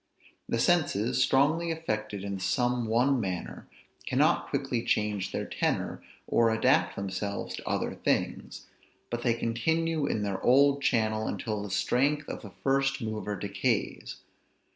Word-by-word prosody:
The - - 0
senses, 125 - +2
strongly 150 +6 +3
affected 110 -11 -3
in 100 -1 -4
some 120 +5 0
one 125 +4 +3
manner, 95 -5 -4 0.4
cannot - - +2
quickly 120 -1 -1
change 105 -4 0
their - - -3
tenor, - - -2 0.2
or 115 -1 +3
adapt 110 0 +2
themselves 100 +1 -4
to - - -6
other - - -1
things; - - -2 0.5
but 120 0 -2
they 120 -2 +2
continue 155 +7 0
in 105 - -1
their 100 -2 -2
old 140 +2 +4
channel 110 -4 +1
until 105 -2 -3
the 105 - -6
strength 135 +10 +1
of - - -6
the 105 - -9
first 135 0 +2
mover 110 -3 -3
decays. 100 +4 -2
115 Hz, 140 wpm, -29 LUFS, 105-135 Hz, 0.5 s, old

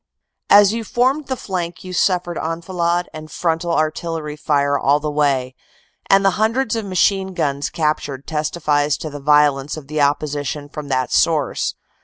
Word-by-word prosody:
"As 205 0 +7
you 230 0 -3
formed 260 +6 0
the 260 - -1
flank 180 -5 -5
you 185 0 -7
suffered 175 -1 +1
enfilade 170 +2 -1
and 155 0 -9
frontal 170 +1 -1
artillery 155 -1 -2
fire 140 -1 +1
all 140 +1 +2
the 150 0 -3
way, 140 -4 +1 0.6
and 195 0 +5
the 195 - +5
hundreds 230 +1 +1
of 225 -2 -3
machine 190 0 +1
guns 140 -4 -1
captured 150 -3 -2
testifies 150 -2 0
to 155 - -6
the 145 - -7
violence 145 0 +2
of 155 - -9
the 155 +2 -2
opposition 145 0 -1
from 150 -1 -7
that 130 -2 -1
source. 155 -5 +1
155 Hz, 160 wpm, -19 LUFS, 145-185 Hz, 0.6 s, As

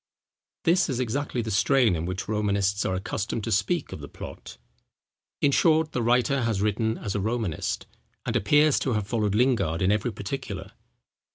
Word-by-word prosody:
This 170 +1 +3
is 130 -3 -1
exactly 125 0 -1
the 110 - -4
strain 120 0 +3
in 80 +1 -3
which 95 +1 -4
Romanists 100 -1 0
are 95 - 0
accustomed 100 +3 -3
to - - -3
speak 135 - 0
of - - -6
the 70 - -8
plot. - - -10 0.8
In 140 - +4
short, 160 +1 +3
the 125 - -1
writer 125 +4 +2
has 115 -4 0
written 105 +2 0
as 100 - -4
a 105 - -1
Romanist, 110 -5 -2 0.4
and - - -2
appears 150 +8 +4
to 130 - -1
have 105 -2 -1
followed 105 -3 0
Lingard 115 -10 +2
in 95 +1 +2
every 105 +3 0
particular. 100 -4 -6
110 Hz, 175 wpm, -26 LUFS, 100-130 Hz, 0.8 s, In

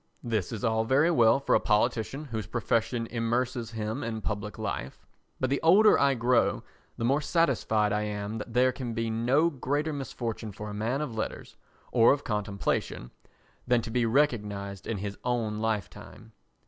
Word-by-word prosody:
This 110 -7 -1
is 110 -3 -5
all 110 -1 +2
very 140 +8 +3
well 120 -3 +5
for 140 - 0
a - - +5
politician 115 +5 0
whose 110 -3 -3
profession 115 0 0
immerses 120 +1 -1
him 110 +3 -4
in 110 -1 -4
public 105 0 -4
life, 65 - -5 0.3
but 130 0 0
the 140 - +1
older 200 +7 +6
I 140 -1 +3
grow 120 0 +2 0.3
the 115 - -2
more 140 +5 +2
satisfied 120 - +1
I 105 - +1
am 105 +1 -4
that 105 - -7
there 125 +2 +3
can 125 -3 -5
be 115 -1 -1
no 130 +9 +2
greater 145 +3 -1
misfortune 115 -5 -5
for 105 +2 -7
a - - -6
man 115 +7 -1
of 150 -6 -4
letters 110 - -5 0.4
or 115 0 +6
of 145 - -4
contemplation 100 - -2 0.6
than 120 -2 +3
to 115 - -6
be 120 -1 +1
recognised 105 -7 0
in 115 - -2
his 100 +1 -5
own 115 -4 -1
lifetime. 110 +1 -4
115 Hz, 175 wpm, -28 LUFS, 105-130 Hz, 0.6 s, older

